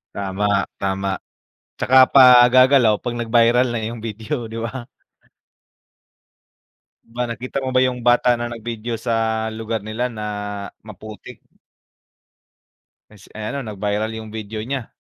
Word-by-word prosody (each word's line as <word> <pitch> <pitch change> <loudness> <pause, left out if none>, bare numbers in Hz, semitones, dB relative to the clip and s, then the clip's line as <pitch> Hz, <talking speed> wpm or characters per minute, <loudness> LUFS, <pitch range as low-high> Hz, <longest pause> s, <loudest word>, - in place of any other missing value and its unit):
Tama, 100 0 -3 0.3
tama, 95 0 -2 0.7
tsaka 130 - +3 0.2
pa 135 - +8 0.3
gagalaw 130 -3 +5
pag 120 -1 -4
nag-viral 120 +1 +3
na 120 - -2
yung 115 -1 -8
video 115 +2 -5
'di 115 - -5
ba. 120 +1 -6 2.3
Ba 125 0 -3
nakita 125 +3 -5
mo 130 - -3
ba 130 - 0
yung 125 -1 -2
bata 120 +1 +3
na 120 0 -3
nag-video 115 0 -5
sa 115 +1 -3 0.4
lugar 110 -1 -4
nila 120 +3 -2
na 110 -3 -7 0.6
maputik? 105 0 -11 1.7
Ay 105 - -17
si - - -18
ay 110 +3 -5
ano 140 - -3
nag-viral 105 -1 -3
yung 110 -1 -9
video 110 0 -6
nya, 130 -2 -4
115 Hz, 130 wpm, -20 LUFS, 110-125 Hz, 2.3 s, pa